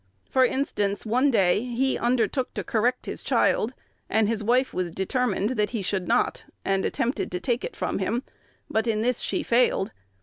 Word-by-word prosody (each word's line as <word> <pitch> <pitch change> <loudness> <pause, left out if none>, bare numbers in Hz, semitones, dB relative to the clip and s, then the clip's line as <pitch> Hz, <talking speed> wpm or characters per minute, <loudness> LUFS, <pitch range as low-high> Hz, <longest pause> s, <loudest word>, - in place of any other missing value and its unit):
For 260 - +3
instance: 210 -7 0
one 250 +6 +3
day 200 -3 +3
he 250 +2 0
undertook 250 +2 0
to - - -2
correct 245 +2 0
his - - -5
child, 240 +4 +1 0.3
and 220 0 +3
his 220 -1 0
wife 250 +4 +2
was 180 -1 -1
determined 205 +3 0
that 210 -5 0
he 225 -4 -3
should 190 -1 -2
not, - - +1 0.2
and 195 -1 +1
attempted 265 0 -1
to 180 - -2
take 240 +6 -1
it - - -5
from - - -2
him; 245 +3 -1 0.4
but 220 +2 0
in 220 -1 +1
this 250 0 +1
she - - -1
failed. 235 -5 +2
230 Hz, 180 wpm, -26 LUFS, 205-250 Hz, 0.4 s, For